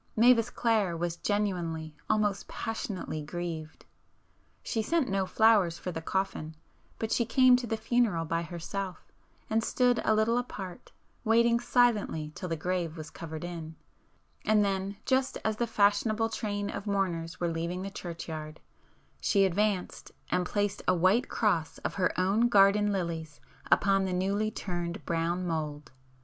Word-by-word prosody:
Mavis 230 0 +5
Clare 215 -9 +1
was 170 0 -2
genuinely, 170 -6 -2
almost 210 -2 +1
passionately 205 -8 -4
grieved. 160 0 -6 0.8
She 225 - -1
sent 320 +5 +1
no 195 -1 0
flowers 205 -7 +4
for 180 - -5
the 160 - -5
coffin, 160 -3 -2 0.4
but 220 0 -3
she 235 - +3
came 250 +2 +5
to 245 -1 -4
the 225 - -1
funeral 220 -7 +1
by 165 +1 -1
herself, 175 +3 -6 0.4
and 220 +1 +1
stood 245 -1 +2
a 220 - +3
little 225 +3 +2
apart 195 -7 -7 0.3
waiting 235 +1 +4
silently 230 -11 +2
till 180 - -6
the 165 - 0
grave 170 0 -2
was 155 -1 -8
covered 160 -1 -7
in,—and 175 +5 -3
then, 195 0 -2
just 260 0 +1
as 220 -1 0
the 235 - 0
"fashionable" 215 +2 +2
train 205 -2 -3
of 205 - -6
mourners 185 -4 -1
were 175 -1 0
leaving 170 +3 -3
the 195 - -5
churchyard, 160 -4 -6 0.6
she 200 -2 +3
advanced 195 0 -1 0.2
and 180 0 +1
placed 205 0 -1
a 185 - +4
white 185 +8 +3
cross 175 -8 0
of - - -1
her 190 -2 +1
own 205 +6 +3
garden 205 0 +5
lilies 165 -5 -3 0.3
upon 195 -1 +4
the 185 - -2
newly 200 +4 0
turned 175 -2 -4
brown 170 +2 -1
mould. 150 -3 -3
195 Hz, 150 wpm, -29 LUFS, 170-215 Hz, 0.8 s, Mavis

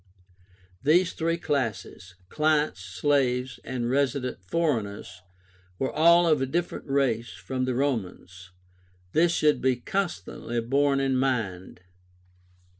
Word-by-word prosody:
These 170 +6 +3
three 165 +1 -1
classes, 115 - -3
clients, 150 -6 +1
slaves, 125 +7 0
and 125 -2 -3
resident 130 -3 -1
foreigners, 100 - -2 0.6
were 135 - -1
all 170 +2 +5
of 155 -4 +3
a 135 - 0
different 170 +4 -3
race 120 -5 0
from 130 -1 -3
the 130 -1 -1
Romans. 95 -9 -3 0.6
This 165 - +3
should 150 -3 +2
be 130 0 +2
constantly 120 - -3
borne 140 +4 +1
in 135 -1 +1
mind. 110 -10 -2
130 Hz, 115 wpm, -26 LUFS, 115-150 Hz, 0.6 s, all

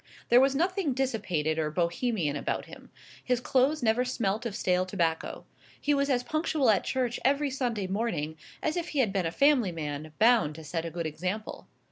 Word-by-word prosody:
There 240 +1 +7
was 270 +1 +3
nothing 355 -1 +1
dissipated 180 - -1
or 155 -1 0
Bohemian 170 - 0
about 145 - -2
him. - - -13 0.3
His 250 -1 +1
clothes 270 +3 +1
never 225 +2 +3
smelt 230 -3 -1
of 205 - -6
stale 180 -3 +1
tobacco. 165 -3 -2 0.3
He 295 - +1
was 280 0 +1
as 250 -2 +2
punctual 310 -4 +1
at 205 - +2
church 250 -3 -1
every 280 +2 +2
Sunday 240 -6 -1
morning 185 -6 -2 0.3
as 310 - 0
if 345 -1 -2
he 295 - -5
had 215 -6 0
been 190 -4 0
a - - -3
family 275 - +3
man, 155 -1 -5
bound 220 -10 +4
to 160 - -9
set 165 +1 -3
a - - -3
good 170 0 -4
example. 180 +7 -4
225 Hz, 190 wpm, -28 LUFS, 170-265 Hz, 0.3 s, There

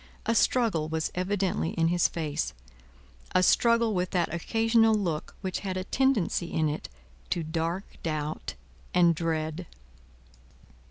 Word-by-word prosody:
A 230 - +2
struggle 220 -10 +2
was 160 0 -1
evidently 185 -2 -1
in 165 0 +2
his 175 0 +3
face; 145 - -3 0.8
a 185 - +5
struggle 230 +2 +4
with 180 -1 0
that 175 -2 0
occasional 225 +5 +3
look 170 -7 -2
which 190 -3 -2
had 190 -2 -3
a 185 - -2
tendency 220 -8 +1
in 155 -1 +1
it 150 - -5 0.4
to 170 - 0
dark 165 +4 -2 0.2
doubt 155 - -3 0.4
and 175 -1 +5
dread. 160 +1 -2
175 Hz, 130 wpm, -28 LUFS, 160-205 Hz, 0.8 s, a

